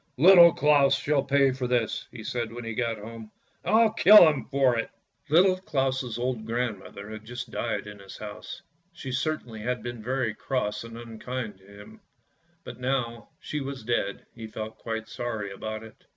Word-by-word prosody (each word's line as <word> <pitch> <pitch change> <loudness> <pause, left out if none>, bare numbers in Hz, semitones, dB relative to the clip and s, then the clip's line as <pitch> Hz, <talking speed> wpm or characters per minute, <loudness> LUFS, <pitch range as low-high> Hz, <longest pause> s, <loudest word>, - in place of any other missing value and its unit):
" - - -46
Little 175 -3 +10
Claus 145 -2 +4
shall 145 -1 +1
pay 140 0 +3
for 130 -1 -3
this! 120 -2 -1
" - - -41
he 115 -3 -9
said 120 0 -3
when 120 +1 -7
he 115 0 -4
got 115 -1 -1
home. 110 +1 -9 0.3
"I'll 220 0 +4
kiU 215 -1 +8
him 150 -3 0
for 135 -3 +3
it." - - -3 0.4
Little 185 +4 +5
Claus' 130 -8 -1
old 120 -2 -2
grandmother 110 -3 -4
had 110 0 -8
just 120 +1 -7
died - - -2
in 105 -1 -10
his 100 0 -11
house; 105 0 -8 0.3
she 135 - -7
certainly 125 -4 -2
had 125 +1 -3
been 120 -2 -6
very 125 -1 -1
cross 105 -4 -2
and 115 0 -9
unkind 115 -2 -6
to 95 - -21
him, 105 - -14 0.6
but - - -9
now 125 -2 -1 0.2
that - - -21
she 150 - -2
was 135 -3 -6
dead 110 -4 -2
he 115 -1 -8
felt 110 0 -7
quite 115 -1 -4
sorry 110 -3 -4
about 110 +2 -6
it. 110 +4 -15
120 Hz, 190 wpm, -27 LUFS, 110-135 Hz, 0.6 s, Little